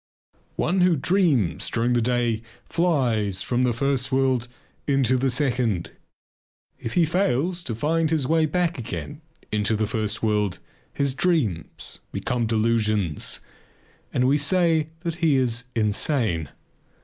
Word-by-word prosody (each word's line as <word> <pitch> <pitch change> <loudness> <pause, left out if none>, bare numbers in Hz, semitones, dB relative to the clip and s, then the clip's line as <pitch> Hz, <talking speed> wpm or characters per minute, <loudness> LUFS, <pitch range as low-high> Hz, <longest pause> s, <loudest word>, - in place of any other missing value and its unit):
One 180 +3 +1
who 180 -1 +4
dreams 140 - +1
during 120 +1 +1
the 120 - +2
day 120 -2 0 0.2
flies 120 - +1
from 120 +6 0
the 125 -1 +3
first 130 +2 -1
world 130 -2 +1 0.4
into 135 -3 +3
the 130 +1 +1
second. 125 - 0 0.9
If 115 - -5
he 175 - +4
fails 170 0 0
to 115 - -3
find 160 +6 +1
his 155 -4 +1
way 160 +2 +2
back 170 -1 0
again 145 +5 -6 0.3
into 105 +1 +1
the 110 0 0
first 110 0 -2
world 105 -4 +1 0.3
his 140 -2 0
dreams 130 - -1
become 120 -2 -1
delusions 110 -6 +1 0.7
and 125 0 +2
we 145 +3 +3
say 160 0 +2
that 170 -2 -2
he 160 -4 +4
is 125 -2 0
insane. 105 - 0
125 Hz, 135 wpm, -24 LUFS, 110-155 Hz, 0.9 s, who